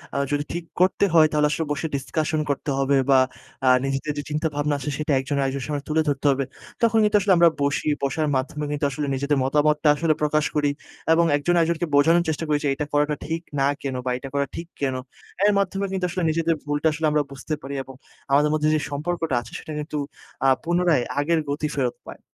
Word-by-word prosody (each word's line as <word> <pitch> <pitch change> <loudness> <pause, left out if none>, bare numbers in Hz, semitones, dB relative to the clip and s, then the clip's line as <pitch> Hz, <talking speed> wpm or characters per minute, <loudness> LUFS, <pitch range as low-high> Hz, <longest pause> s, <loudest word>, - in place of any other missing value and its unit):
আ - - 0
যদি 145 0 0
ঠিক 175 - -3 0.2
করতে 185 +2 +3
হয়, 160 -2 +7
তাহলে 150 -1 +3
আসলে 160 +1 -1
বসে 155 +2 -1
discusion 155 +3 -1
করতে 140 +1 -2
হবে 135 0 +3
বা, 135 -1 +6 0.5
আ - - +3 0.2
নিজেদের 135 +2 -2
যে, 145 - -3
চিন্তাভাবনা 150 -1 -1
আছে, 150 - -4
সেটা 150 0 -2
একজন 140 +2 -2
আরেকজনের 135 -1 -2
সামনে 145 -2 -3
তুলে 155 +1 +2
ধরতে 140 0 -2
হবে। 135 0 0 0.4
তখন 225 -1 +3
কিন্তু 210 0 +4
আসলে 195 -1 +4
আমরা 170 0 +7
বসি, 140 +2 0 0.2
বসার 150 +3 0
মাধ্যমে 150 +3 -2
কিন্তু 145 0 -1
আসলে 145 +2 -3
নিজেদের 140 +2 0
মতামতটা 150 +2 +2
আসলে 165 0 +2
প্রকাশ 150 0 +2
করি 145 -1 +2 0.4
এবং 170 +1 +4
একজন 175 +5 0
আরেকজনকে 170 0 +1
বোঝানোর 165 +4 +5
চেষ্টা 160 +1 -2
করি 150 -1 +2
যে, 145 - +1
এটা 150 +1 -3
করাটা 150 +1 +2
ঠিক 165 +1 -3 0.2
না 135 - +3 0.2
কেন 135 -2 -3
বা, - - 0
এটা 135 +1 -8
করা 140 0 +1
ঠিক 170 0 -6
কেন। 135 -2 0 0.5
এর 210 - +5
মাধ্যমে 195 +1 -1
কিন্তু 185 -1 -1
আসলে 180 0 -2
নিজেদের 165 +1 +1
ভুলটা 145 +1 0
আসলে 155 +1 -2
আমরা 150 -1 +2
বুঝতে 140 +3 -5
পারি 140 +1 -6
এবং 135 -1 -12 0.4
আমাদের 145 +2 +4
মধ্যে, 155 0 +1
যে, 155 - +2
সম্পর্কটা 160 -1 -2
আছে, 115 - -13
সেটা 155 - -8
কিন্তু 150 0 -4 0.5
আ - - +5 0.2
পুনরায় 175 -6 +2 0.2
আগের 165 +3 +2
গতি 150 +2 -1
ফেরত 130 -4 0
পায়। - - -9
150 Hz, 210 wpm, -23 LUFS, 140-165 Hz, 0.5 s, হয়